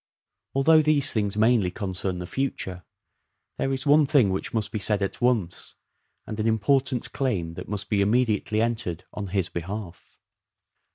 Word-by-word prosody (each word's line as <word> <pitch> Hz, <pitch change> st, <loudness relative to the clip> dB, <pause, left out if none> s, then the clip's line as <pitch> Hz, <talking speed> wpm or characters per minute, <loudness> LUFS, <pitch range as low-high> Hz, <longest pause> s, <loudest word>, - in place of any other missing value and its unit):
Although 155 Hz, +4 st, +5 dB
these 145 Hz, -2 st, +4 dB
things 105 Hz, -2 st, -1 dB
mainly 110 Hz, -3 st, +3 dB
concern 95 Hz, -1 st, -3 dB
the 90 Hz, -, -5 dB
future, 95 Hz, -7 st, -3 dB, 0.8 s
there 135 Hz, -, 0 dB
is 135 Hz, +1 st, -3 dB
one 145 Hz, 0 st, +5 dB
thing 135 Hz, -10 st, +4 dB
which 95 Hz, -, -3 dB
must 110 Hz, -2 st, -2 dB
be 110 Hz, -, -3 dB
said 105 Hz, +1 st, +3 dB
at 100 Hz, -, -4 dB
once, 115 Hz, -8 st, -1 dB, 0.5 s
and 110 Hz, -, -6 dB
an 110 Hz, -, 0 dB
important 125 Hz, +3 st, +1 dB
claim 95 Hz, -12 st, -2 dB
that -, -, -9 dB
must 100 Hz, -1 st, -4 dB
b« 105 Hz, -2 st, +1 dB
immediately 110 Hz, 0 st, +1 dB
entered 110 Hz, -8 st, -2 dB
on 105 Hz, -1 st, -5 dB
his 95 Hz, -1 st, -1 dB
behalf. 95 Hz, +1 st, -7 dB
105 Hz, 160 wpm, -25 LUFS, 95-125 Hz, 0.8 s, Although